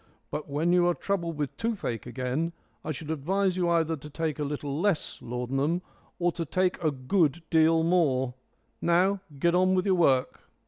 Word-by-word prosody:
But 150 - -4
when 155 +5 +1
you 175 -1 +4
are 175 - +2
troubled 170 -5 -2
with 145 -2 -3
toothache 190 - -3
again 130 +7 -2 0.3
I 155 - -3
should 155 +1 -5
advise 185 +5 0
you 180 -2 +1
either 165 -1 +2
to 150 0 -10
take 155 0 -3
a - - 0
little 145 +1 -3
less 195 -6 0
laudanum 135 +8 -1 0.3
or 175 0 +1
to 170 - -3
take 180 +3 0
a 155 - +4
good 150 +4 +1
deal 160 0 +4
more. 140 -8 +2 0.5
Now 185 +3 +3 0.2
get 170 +5 +2
on 185 +1 +4
with 185 - +1
your 195 - +3
work." 140 -8 +1
165 Hz, 180 wpm, -28 LUFS, 140-180 Hz, 0.5 s, you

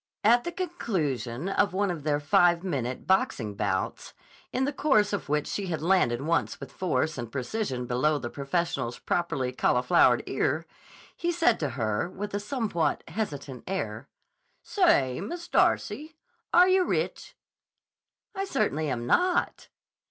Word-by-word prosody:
At 235 +3 +5
the 345 - -2
conclusion 175 - -2
of 195 0 +1
one 200 0 +1
of 165 -3 -5
their 145 0 0
five 170 +4 +3
minute 130 -9 -3
boxing 125 - +1
bouts, - - -2 0.4
in 260 +1 0
the 285 - -2
course 215 -9 +2
of 200 - -3
which 150 0 +1
she 200 -2 -3
had 160 -3 -3
landed 160 -10 +2
once 165 +2 0
with - - -9
force 160 -5 -1
and 120 -1 -6
precision 130 - -3
below 140 +5 +1
the 120 -4 -5
professional's 140 -4 -2
properly 145 -7 -1
cauliflowered 125 -1 +3
ear, 145 +4 -1 0.5
he 345 - -1
said 330 -9 +2
to 150 - -1
her, 110 +6 -1
with 205 +2 -6
a 205 - 0
somewhat 210 - -1
hesitant 145 - -5
air: 130 - -4 0.5
"Say, 140 - +2
Miss 345 - -6
Darcy; 315 -2 +1 0.4
are 355 +2 +7
yah 375 0 +4
rich?" 360 - -2 1.0
"I 390 -1 -2
certainly 155 - 0
am 120 -2 -2
not." 355 - +1
170 Hz, 145 wpm, -27 LUFS, 130-220 Hz, 1.0 s, are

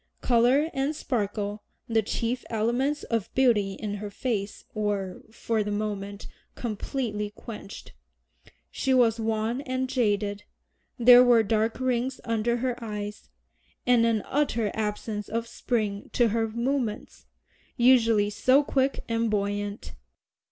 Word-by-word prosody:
Color 255 +6 +3
and 275 +3 -1
sparkle, 210 -6 -2 0.3
the 225 -1 +2
chief 230 +4 -2
elements 240 +6 0
of 230 -4 -2
beauty 225 -7 +3
in 205 +1 -4
her 205 0 -6
face, 205 -2 -3
were, 205 -3 -2
for 220 -1 -1
the 205 - -4
moment, 205 -1 -4 0.3
completely 215 -2 -3
quenched. 210 -1 -10 0.8
She 265 -1 +1
was 230 -3 +4
wan 225 +3 -1
and 260 -1 -2
jaded, 205 -5 0 0.5
there 245 0 +8
were 240 -2 +5
dark 220 +2 0
rings 255 0 -1
under 230 +1 0
her 245 -1 -2
eyes, 210 -1 -6 0.6
and 245 -2 +4
an 220 -3 +1
utter 235 -7 0
absence 210 -1 -3
of 230 +2 -2
spring 215 -4 -2
to 240 -2 +3
her 225 +1 0
movements, 235 -1 -3 0.5
usually 230 -4 +4
so 260 +7 +4
quick 275 -1 0
and 230 0 0
buoyant. 205 0 -2
225 Hz, 125 wpm, -27 LUFS, 210-245 Hz, 0.8 s, there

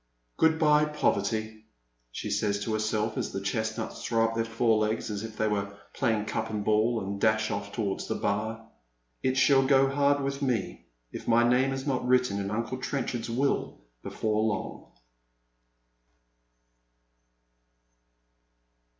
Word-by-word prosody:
"Good 160 0 +4
bye, 150 -1 +4
Poverty," 110 -6 -1 0.5
she - - -5
says 100 -1 0
to 110 - -2
herself 110 0 -1
as - - -3
the - - -3
chestnuts 110 +2 -3
throw 115 -1 +2
up 115 - -4
their 115 0 0
fore 115 -1 +2
legs 110 +1 -1
as 105 0 -4
if 110 -1 -8
they 110 - +1
were 100 -1 -2 0.2
playing 110 -5 0
cup 110 +1 -3
and 105 -2 -3
ball, 110 +2 +2
and 100 0 -5
dash 110 0 +2
oi£ 100 - -4
towards 100 -4 -3
the - - -2
Bar. 110 +2 -2 0.3
" - - -46
It 130 0 0
shall 135 0 +5
go 135 0 +4
hard 140 0 +2
with 140 +1 -3
me 125 -7 -2 0.2
if - - -8
my 115 +1 +5
naoM 125 +3 +3
is 135 0 -4
not 135 -3 0
written 125 -5 +2
in 100 0 -3
Uncle 115 +4 -3
Trenchard's 125 -3 -3
will 135 +4 -1 0.2
before 110 -1 -1
long." 110 0 -3
115 Hz, 150 wpm, -28 LUFS, 105-130 Hz, 0.5 s, shall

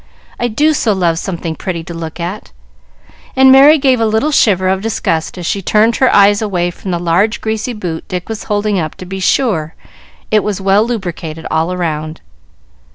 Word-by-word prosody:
I 240 - 0
do 295 +7 +2
so 230 -7 +1
love 170 -4 0
something 170 -4 -4
pretty 170 -2 -4
to 170 - -8
look 165 0 -7
at!" 180 +5 -6 0.8
and 265 0 +6
Merry 280 +4 +7
gave 265 -3 +2
a - - +3
little 220 +8 0
shiver 190 -9 +3
of 190 0 0
disgust 185 -7 -2
as 175 - -6
she 200 - -1
turned 215 +4 +2
her 260 - +3
eyes 205 +1 +4
away 180 -5 -1
from 190 - -9
the 175 - 0
large 180 +7 +1
greasy 220 +2 -3
boot 175 -7 -5
Dick 180 -2 -5
was 220 -1 -6
holding 205 -2 0
up 155 -2 -4
to 185 - -10
be 190 +1 -6
sure 185 - 0 0.6
it 215 -1 +3
was 210 -2 -2
well 195 +2 +3
lubricated 170 -8 -5
all 165 +3 0
round. 155 -2 -3
195 Hz, 190 wpm, -14 LUFS, 170-220 Hz, 0.8 s, Merry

